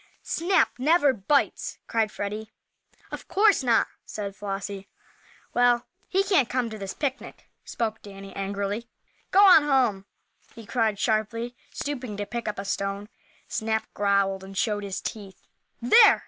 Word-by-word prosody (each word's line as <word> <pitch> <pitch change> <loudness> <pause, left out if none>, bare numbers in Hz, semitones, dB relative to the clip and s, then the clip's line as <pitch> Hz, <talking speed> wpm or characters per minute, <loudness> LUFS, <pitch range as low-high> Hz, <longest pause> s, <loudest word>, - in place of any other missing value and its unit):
"Snap 350 0 +2
never 290 0 +4
bites!" 255 +6 0
cried 220 -2 0
Freddie. 210 +2 -5 0.6
"Of - - -7
course 410 -2 +4
not," 235 -3 +4 0.2
said 200 -2 -6
Flossie. 195 0 -5 0.7
"Well, 245 0 +3 0.2
he 385 +1 +2
can't 370 - +2
come 245 -3 -1
to 215 - -7
this 195 -1 -5
picnic!" 280 -2 -4 0.2
spoke 220 -2 -3
Danny, 195 -1 -11
angrily. 200 +4 -3 0.4
"Go 400 +1 +6
on 360 -5 +9
home!" 250 -9 +1 0.5
he 230 -2 -10
cried, 220 -2 0
sharply, 230 +3 -1 0.2
stooping 255 -7 -4
to 205 - -3
pick 235 +3 -5
up 210 - -3
a 195 - -5
stone. 200 +1 -3 0.4
Snap 220 0 -1
growled 200 -1 +1
and 195 0 -10
showed 210 -1 0
his 195 -2 -4
teeth. 200 -4 -8 0.3
"There!" 405 - +7
220 Hz, 145 wpm, -26 LUFS, 200-255 Hz, 0.7 s, on